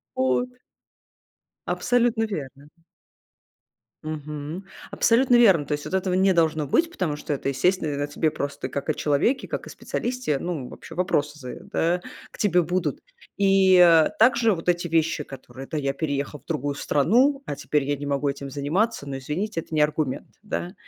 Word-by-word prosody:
Вот. 130 - +1 1.2
Абсолютно 240 -2 +1
верно, 140 -9 -6
ага. 165 +2 -26 1.2
Мгм, 150 +3 -6 0.3
абсолютно 245 +2 +4
верно. 195 -11 +5
То 150 - -6
есть 145 0 -2
вот - - -5
этого 190 -1 0
не 190 +1 +3
должно 160 -3 +2
быть, 330 - +2
потому 170 - -2
что 150 - -5
это, 135 -1 -2
естественно, 145 +1 0
о - - -1
тебе 150 +2 0
просто 140 -1 -4
как 140 - -5
о - - +1
человеке, 150 - +1
как - - -4
о - - -8
специалисте. 250 - -2
Ну, 150 -6 -4
вообще - - -11
вопросы 150 -4 0
за 125 -3 -7
да 175 +2 0 0.3
к - - -14
тебе 180 -4 +3
будут. 175 -3 -1 0.4
И 195 -2 +5 0.4
также 230 -1 +5
вот 165 0 -8
эти 175 0 +1
вещи, 160 -2 +1
которые: 130 -1 -10
это 155 - -3
я 140 -1 -1
переехал 145 -1 -3
в - - -38
другую 145 +2 -2
страну, 245 - +2
а 145 - -4
теперь 150 0 0
я 145 +1 -1
не 145 - -7
могу 140 0 0
этим 140 0 -5
заниматься, 150 - -1
но, 135 - -4
извините, 165 +9 -3
это 160 - -9
не 155 - +2
аргумент, 150 -2 0
да, 185 -4 -4
155 Hz, 170 wpm, -24 LUFS, 145-190 Hz, 1.2 s, верно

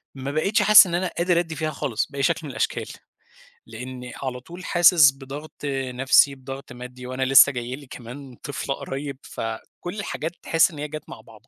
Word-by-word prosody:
ما 135 +1 -5
بقيتش 195 +8 +1
حاسس 210 -2 +9
إن 170 - -2
أنا 185 +1 0
قادر 170 0 +2
أدّي 165 -2 -3
فيها 155 +1 -2
خالص 120 -7 -2
بأي 140 -1 -3
شكْل - - +2
من 145 - -6
الأشكال، 115 - -2 0.8
لأني 125 +2 -8
على 125 -1 -3
طول 175 +8 -11
حاسس 175 -5 +6
بضغْط 140 +3 -10
نَفسي، 135 0 +3
بضغط 135 +1 -9
مادّي 125 0 -10
وأنا 130 +1 -3
لسّه 135 +2 +7
جاي 125 0 -5
لي 140 -2 -14
كمان 125 +2 -10
طفلة 140 -1 -3
قريّب 140 0 -6
فكلّ 115 - -7
الحاجات 160 -5 -4
تحس 165 +2 +3
إن 150 - -10
هي 150 - -3
جات 155 0 -8
مع - - -10
بعضه - - -18
140 Hz, 190 wpm, -23 LUFS, 130-155 Hz, 0.8 s, حاسس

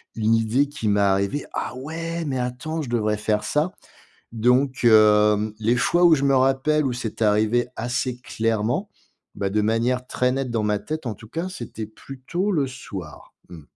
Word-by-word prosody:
une 110 0 +2
idée 115 +5 +2
qui 140 -7 -5
m'est 100 0 +2
arrivée: 100 +7 +1
«Ah - - -3
ouais, 165 +5 -5
mais 130 -3 -2
attends, 125 +6 -3
je 130 - -6
devrais 110 -3 0
faire 105 0 0
ça», 155 +5 0 0.6
donc 125 +4 +2
hem, 105 -1 +5
les 115 +3 +2
fois 175 +8 +2
où 170 -2 +7
je 140 - -1
me 135 -1 +3
rappelle 135 +3 +2
où 130 - 0
c'est 115 -2 -5
arrivé 110 +3 +2
assez 125 +1 -2
clairement, 115 - -1 0.5
bah, 100 - -1
de 105 +2 +1
manière 120 +4 +1
très 125 0 +1
nette 135 -1 -2
dans 115 -2 -1
ma 105 -1 0
tête, 155 -3 -5
en 110 - -2
tout 110 - -14
cas, 165 +7 -3
c'était 120 - -7
plutôt 135 - -4
le 150 -8 +1
soir. 100 - -9
Mmh. 85 -4 -11
120 Hz, 185 wpm, -23 LUFS, 110-140 Hz, 0.6 s, où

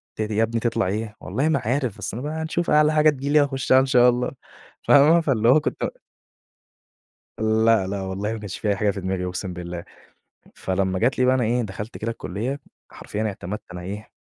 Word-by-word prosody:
ت - - -4
دي 105 0 -2
يا 110 - +3
ابني 115 +1 -1
تطلع 115 -4 0
إيه؟ 105 +2 -3
والله 145 +4 -1
ما 155 -3 +2
عارف، 125 -1 -1
بس 105 - -5
أنا 120 +4 -5
بقى 150 +1 -3
هنشوف 165 +2 -2
أعلى 150 0 +4
حاجة 155 0 +5
تيجي 140 -1 -3
لي 150 +1 +5
هاخشّها 135 -2 +3
إن 135 - +2
شاء 125 -2 +5
الله 125 0 -1 0.6
فاهمة؟ 155 +4 +6
فاللي 120 -7 +2
هو 140 +5 +6
كنت - - -3 1.5
لأ، 110 -2 +3
لأ، 100 0 -3
والله 95 +3 -3
ما 115 - -5
كانش 105 -3 -6
في 105 - -1
أي 100 - +2
حاجة 105 +1 +1
في 100 - -6
دماغي 95 0 -2
أقسم 90 0 -4
بالله. 85 -1 -6 0.7
فلمّا 95 0 -1
جات 120 +7 +1
لي 130 - +3
بقى 130 +1 +4
أنا 130 -2 +1
إيه، 120 +2 +1
دخلت 105 +1 -6
كده 115 +2 -3
الكلّية، 115 +6 -4 0.3
حرفيًا 105 - -5
اعتمدت 105 -1 -4
أنا 90 - -7
إيه، 100 +4 -7
110 Hz, 210 wpm, -23 LUFS, 100-135 Hz, 1.5 s, فاهمة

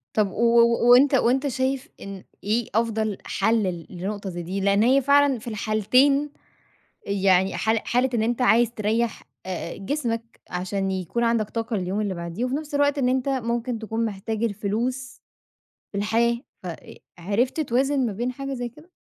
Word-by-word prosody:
طَب 210 -3 +2
و - - -4 0.2
و 235 0 +4
و - - +7
وأنت 270 +3 +6
وأنت 260 +2 +2
شايف 265 +2 -1
إن 195 -1 -8 0.2
إيه 220 +3 0
أفضل 220 -3 0
حَل 225 -1 +1
ل 175 -4 -4
لنقطة 195 +2 -5
زي 175 -1 -5
دي، 185 +4 -3
لإن 200 +2 +3
هي 265 +4 +4
فعلًا 280 -1 +4
في 220 - -13
الحالتين 250 +7 +2 0.8
يعني 190 -1 +2
حال 220 0 +1
حالة 250 +2 +1
إن 225 - +1
أنت 240 +3 0
عايز 235 -1 +4
تريّح 225 +1 -1 0.2
آآ 180 -2 -5
جسمك 230 0 -3
عشان 190 +2 -2
يكون 190 +5 -2
عندك 230 -2 +1
طاقة 225 0 -2
لليوم 190 +2 -2
اللي 205 -3 -1
بعديه 170 +6 -4
وفي 255 +1 -2
نَفْس 295 0 -5
الوقت 285 0 +2
إن 255 -2 +2
أنت 260 +1 0
ممكن 240 -2 -1
تكون 225 +1 -2
محتاج 215 +1 -4
الفلوس 230 +5 -2 0.7
في 200 - -3
الحياة 230 +3 +1 0.2
ف - - -8
آآ 170 -2 -8 0.2
عرفت 210 - 0
توازن 270 0 +1
ما 215 - -2
بين 240 +5 -2
حاجة 275 +1 -5
زي 245 -1 -4
كده؟ 300 +9 -18
230 Hz, 175 wpm, -24 LUFS, 200-255 Hz, 0.8 s, و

